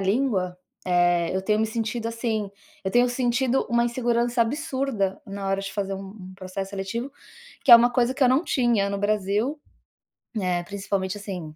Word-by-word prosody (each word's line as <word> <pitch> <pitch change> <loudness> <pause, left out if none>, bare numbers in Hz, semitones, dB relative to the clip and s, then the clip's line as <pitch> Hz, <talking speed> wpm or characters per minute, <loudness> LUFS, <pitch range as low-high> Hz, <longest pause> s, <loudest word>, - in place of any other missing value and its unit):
língua, 195 -3 0 0.3
eh, 175 -1 +2
eu 190 - +1
tenho 210 +2 +1
me 220 - +2
sentido, 225 +1 -3
assim, 225 -3 -2 0.3
eu 190 - -1
tenho 245 +4 +4
sentido 245 +1 +1
uma 235 0 +3
insegurança 240 0 +1
absurda 260 -4 -2
na 195 -1 -5
hora 195 0 0
de 195 - -6
fazer 195 -1 -2
um 195 0 -7 0.2
um - - -13
processo 190 +1 -6
seletivo, 205 +7 -4 0.5
que 260 - +8
é - - +14
uma 240 +1 +4
coisa 245 +1 +2
que 280 - -1
eu - - +5
não 265 +7 +3
tinha 235 -9 +1
no 200 - -2
Brasil, 210 +7 0 0.8
eh, 180 -2 0
principalmente 195 0 -3
assim, 180 -6 -7
210 Hz, 175 wpm, -25 LUFS, 195-240 Hz, 0.8 s, é